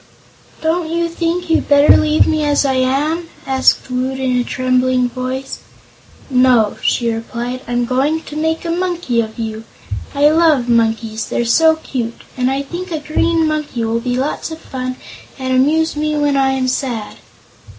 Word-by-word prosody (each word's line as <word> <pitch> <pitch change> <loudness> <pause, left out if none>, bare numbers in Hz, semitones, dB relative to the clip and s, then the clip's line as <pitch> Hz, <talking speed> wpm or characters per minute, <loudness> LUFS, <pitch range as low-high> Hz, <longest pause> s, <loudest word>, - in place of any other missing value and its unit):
"Don't 320 +1 0
you 335 +1 0
think 335 +1 -2
you'd 325 - +1
better 285 0 +7
leave 310 0 +3
me 310 -1 0
as 290 -1 +2
I 270 - +2
am?" 290 +6 0 0.2
asked 265 -1 +2
Woot 260 +1 -2
in 260 -1 0
a 245 - +2
trembling 255 0 +1
voice. 255 +2 -5 0.7
"No," 250 -5 +3
she 235 -2 +1
replied, 240 +2 -5
"I'm 245 0 0
going 275 +6 0
to 295 - -9
make 320 +2 -1
a 335 - -1
Monkey 345 -9 0
of 220 -1 -7
you. 220 -1 -4 0.5
I 290 +1 +5
love 310 -6 +3
monkeys 225 -2 0
they're 240 - -1
so 320 +7 +4
cute! 245 -7 -5
and 255 0 +1
I 270 +1 -1
think 350 +6 -6
a 320 - -1
Green 320 +2 +1
Monkey 300 -6 -2
will 225 +1 0
be 245 +1 -2
lots 275 +5 -2
of 320 - -7
fun 255 -4 -5 0.4
and 260 -1 -2
amuse 305 +5 +2
me 305 0 -1
when 290 -1 +1
I 270 -1 +2
am 260 -1 -1
sad." 245 -4 -3
265 Hz, 170 wpm, -17 LUFS, 250-315 Hz, 0.7 s, better